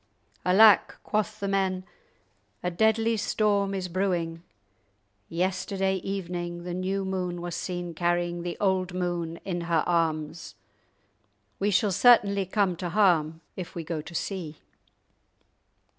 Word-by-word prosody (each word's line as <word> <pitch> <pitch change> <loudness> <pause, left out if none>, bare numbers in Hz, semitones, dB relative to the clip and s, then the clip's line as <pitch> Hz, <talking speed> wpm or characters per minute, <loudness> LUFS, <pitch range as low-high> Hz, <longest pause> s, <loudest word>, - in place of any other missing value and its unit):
"Alack," 205 +3 +6
quoth 215 0 -1
the 200 - -2
men, 190 -1 0 0.8
"a 180 - 0
deadly 220 +4 +2
storm 200 -2 +1
is 185 -1 -3
brewing. 175 -3 -1 0.9
Yesterday 190 +2 0
evening 175 -2 -4
the 175 0 -5
new 190 +2 -2
moon 180 -2 -2
was 175 0 -5
seen 175 -2 -4
carrying 175 +1 0
the 175 0 -4
old 190 -2 0
moon 175 -2 -2
in 175 -3 -2
her 170 -2 +1
arms; 160 -2 -1 1.0
we 200 - +1
shall 205 +1 +2
certainly 200 -3 +5
come 190 -2 +1
to 175 0 -3
harm 165 -5 +2
if 180 -2 -7
we 170 - -4
go 160 -1 -3
to 170 +3 -11
sea." 165 -5 -4
180 Hz, 130 wpm, -27 LUFS, 175-195 Hz, 1.0 s, Alack